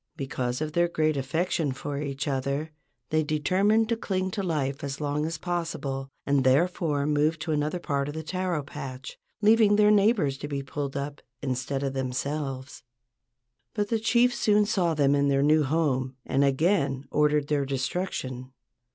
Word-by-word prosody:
Because 130 -2 -3
of 155 0 -2
their 175 +1 +3
great 155 -2 +1
affection 145 +1 -1
for 140 +1 -5
each 140 0 -3
other 140 +3 -2 0.4
they 155 0 +3
determined 190 +9 +2
to 230 - +2
cling 190 -4 -2
to 200 - -2
life 145 -7 -2
as 140 -1 -4
long 150 +1 -1
as 165 0 -4
possible, 155 -6 -3 0.2
and 140 -1 +2
therefore 145 +1 +2
moved 150 +2 +1
to 160 - -2
another 150 +3 0
part 140 -5 -1
of 145 - -5
the 160 - -4
taro 180 -2 -2
patch, 135 -2 -8 0.2
leaving 215 -1 +5
their 210 0 +5
neighbors 200 - +3
to 145 - -5
be 140 -1 -3
pulled 140 0 -4
up 140 +1 -5 0.2
instead 135 +1 -2
of 135 -1 -1
themselves. 135 +1 -3 0.9
But 205 -1 -1
the 225 - +1
chief 240 +2 +3
soon 210 -3 +3
saw 180 -6 +1
them 140 -2 +3
in 140 0 +2
their 140 0 +2
new 155 +2 +4
home 135 -4 0
and 135 - +2
again 140 -1 +1
ordered 150 -1 +2
their 145 -2 0
destruction. 130 -2 -3
150 Hz, 170 wpm, -27 LUFS, 135-175 Hz, 0.9 s, leaving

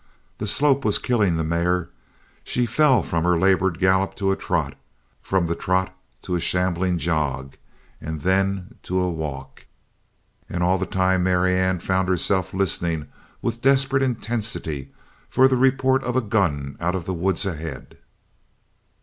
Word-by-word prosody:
The 105 - -3
slope 140 +4 +3
was 105 -3 +2
killing 105 -9 +1
the 80 - -1
mare. 85 +2 0 0.5
She 125 - 0
fell 135 +2 +3
from 80 -1 -1
her 90 0 +3
labored 95 -1 +2
gallop 95 0 +2
to 95 -1 0
a - - +1
trot, - - -2 0.5
from 95 -3 0
the 85 - -1
trot 95 +2 -1 0.3
to 90 - -4
a 90 - +1
shambling 90 +1 0
jog, 70 -5 -1 0.5
and 80 -1 -5
then 95 +3 0
to 90 +1 -2
a 90 -1 0
walk. 80 -4 -7 0.8
And 90 0 -2
all 90 +1 +2
the 95 - -2
time 95 0 +1
Marianne 95 0 +2
found 95 0 0
herself 95 +1 +1
listening 85 -5 -1 0.3
with 115 0 -2
desperate 135 0 +3
intensity 110 - -2 0.4
for 130 - +5
the 130 - +2
report 130 +1 +2
of 125 0 -2
a 130 - +3
gun 85 - -1
out 90 +2 -1
of 90 -3 -4
the 95 - -2
woods 90 +1 +1
ahead! 80 -6 -6
95 Hz, 155 wpm, -23 LUFS, 85-105 Hz, 0.8 s, for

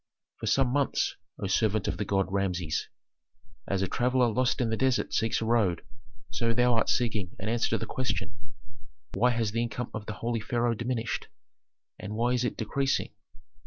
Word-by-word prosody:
"For - - -4
some 135 -2 +3
months, 140 +2 +1 0.2
O - - -4
servant 105 +1 +1
of - - -1
the 105 - -2
gods, 95 -1 +1
Rameses, 90 -5 -1 0.8
as 95 -1 0
a - - +1
traveller 125 +3 +2
lost 125 +5 +1
in 120 -3 +1
the - - +2
desert 130 +1 +1
seeks 115 0 +1
a - - -1
road, 110 -7 +2 0.5
so 115 0 +1
thou 125 0 +4
art 115 - +2
seeking 110 -7 0
an 100 - -3
answer 115 0 +1
to - - +2
the 110 - -4
question: 125 -1 -2 0.8
Why 120 +6 +4
has 115 -3 0
the 115 +2 0
income 120 0 -3
of 110 -1 -5
the 105 - -3
holy 115 +2 -2
pharaoh 120 +2 +1
diminished, 115 0 -2 0.7
and 105 +1 -5
why 120 +2 +2
is 125 -1 +1
it 125 - -1
decreasing? 135 +5 0
115 Hz, 185 wpm, -29 LUFS, 105-125 Hz, 0.8 s, thou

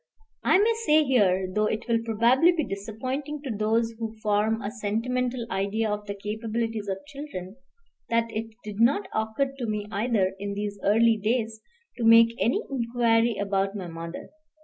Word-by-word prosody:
I - - +5
may 435 +4 +4
say 310 -5 +5
here, 195 -9 +2
though 215 +1 +2
it 215 +2 -3
will 230 -1 +2
probably 235 +9 +4
be 335 -3 -1
disappointing 255 +9 -5
to 255 -6 -3
those 225 +2 +1
who 225 -1 -5
form 215 +1 +1
a 205 -1 -4
sentimental 240 +3 -2
idea 200 +3 0
of 210 0 -4
the 200 - -4
capabilities 220 +1 -3
of 195 +5 -4
children, 275 -9 -8 0.5
that 230 0 +2
it 225 +1 -3 0.2
did 210 -1 -7
not 280 - +3
occur 220 +5 -1
to 245 - -2
me 210 -1 -2
either, 200 -3 +1
in 200 0 -4
these 205 0 -4
early 225 +2 +4
days, 220 0 -1 0.4
to 240 - -3
make 230 0 +7
any 235 - +1
inquiry 235 -2 +2
about 195 0 0
my 195 -3 -5
mother. 165 0 -7
225 Hz, 170 wpm, -26 LUFS, 205-240 Hz, 0.5 s, make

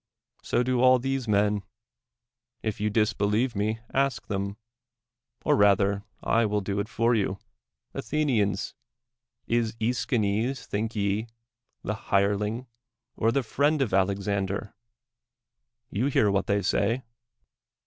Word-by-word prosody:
So 120 - +1
do 125 -1 +1
all 130 0 +7
these 135 0 -2
men. 105 0 +2 1.0
If 110 -2 -3
you 105 - +2
dis 105 0 +2
believe 105 +5 +1
me. 110 +3 -1
ask 135 -6 +1
them; 100 0 -3 0.9
or 150 - +4
rather 100 -2 +3 0.2
I 115 - +3
will 105 0 0
do 100 +1 -2
it 100 +2 -2
for 115 +2 +2
you. 100 -3 0 0.6
Athenians! 120 -6 0 0.7
is 115 -1 0
iEschines, 115 +1 0
think 110 +2 -3
ye 100 +2 0 0.6
the 105 - -1 0.2
hire 100 +1 +3
ling, 105 +5 -3 0.5
or 115 0 +2
the 135 +2 +1
friend 145 +6 +1
of 130 -8 0
Alexander 100 +1 0 1.2
1 100 - -4
You 125 - +2
hear 110 -7 +3
what 100 0 0
they 100 0 +1
say 115 +7 +1
105 Hz, 130 wpm, -27 LUFS, 100-120 Hz, 1.2 s, all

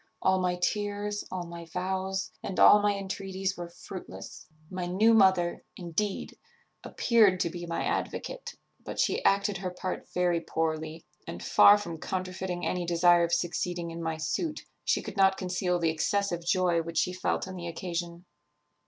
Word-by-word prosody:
All 190 0 +2
my 180 -1 +1
tears, 205 +2 -2
all 185 -1 -3
my 170 0 -8
vows, 190 +2 -3
and 190 - -4
all 210 - +8
my 205 0 +2
entreaties 195 0 -3
were 175 -1 -6
fruitless. 180 +2 -10 0.2
My 180 -1 -3
new 210 +6 +4
mother, 190 -5 +4
indeed, 185 +4 -3 0.4
appeared 215 -6 +3
to 170 - 0
be 175 0 -6
my 170 - -2
advocate; - - -3 0.3
but - - -6
she - - +1
acted 200 0 +2
her 185 0 -3
part 180 +1 -5
very 175 -2 +1
poorly, 160 0 -3 0.2
and, - - -6
far 205 +1 +7
from 170 -6 -6
counterfeiting 185 0 -3
any 180 -1 -1
desire 175 0 +4
of 170 - 0
succeeding 175 0 -1
in 165 0 -6
my 160 -1 -2
suit, 160 - -2 0.2
she - - +1
could - - -8
not 190 0 +4
conceal 180 -1 -1
the 165 -2 +1
excessive 175 +2 -1
joy 175 -1 +2
which 165 0 -6
she 180 - +2
felt 185 +1 -1
on 190 - -7
the 175 -1 -6
occasion. 170 0 -5
180 Hz, 165 wpm, -29 LUFS, 170-190 Hz, 0.4 s, all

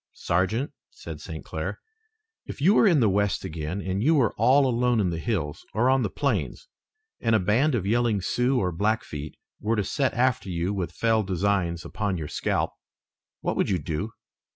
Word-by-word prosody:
"Sergeant," 95 +10 0 0.2
said - - -9
St. - - -7
Clair, - - -4 0.7
"if - - -7
you 175 +9 +5
were 215 - +5
in 165 -8 +4
the 110 - +4
west 100 0 +1
again, 80 +1 -4
and 95 +1 -2
you 155 +7 +4
were 125 -7 +3
all 130 +6 +4
alone 125 -1 +2
in 95 -4 +1
the 85 - -3
hills 85 -9 -2
or 120 +4 +3
on 135 0 +3
the - - 0
plains - - -2 0.5
and 115 -2 +2
a - - +4
band 120 +10 +2
of 100 -5 -1
yelling 115 0 +2
Sioux 125 +7 +1
or 90 -1 0
Blackfeet 85 -6 -2 0.2
were 110 +2 0
to 105 - +1
set 135 +7 0
after 125 -4 +1
you 90 +2 -1
with 95 -3 -3
fell 115 -1 +2
designs 95 -3 0
upon 100 +2 -2
your 80 -2 -4
scalp, - - -1 0.7
what - - -1
would - - +1
you 95 - +2
do?" 80 +7 -3
105 Hz, 190 wpm, -26 LUFS, 90-120 Hz, 0.7 s, you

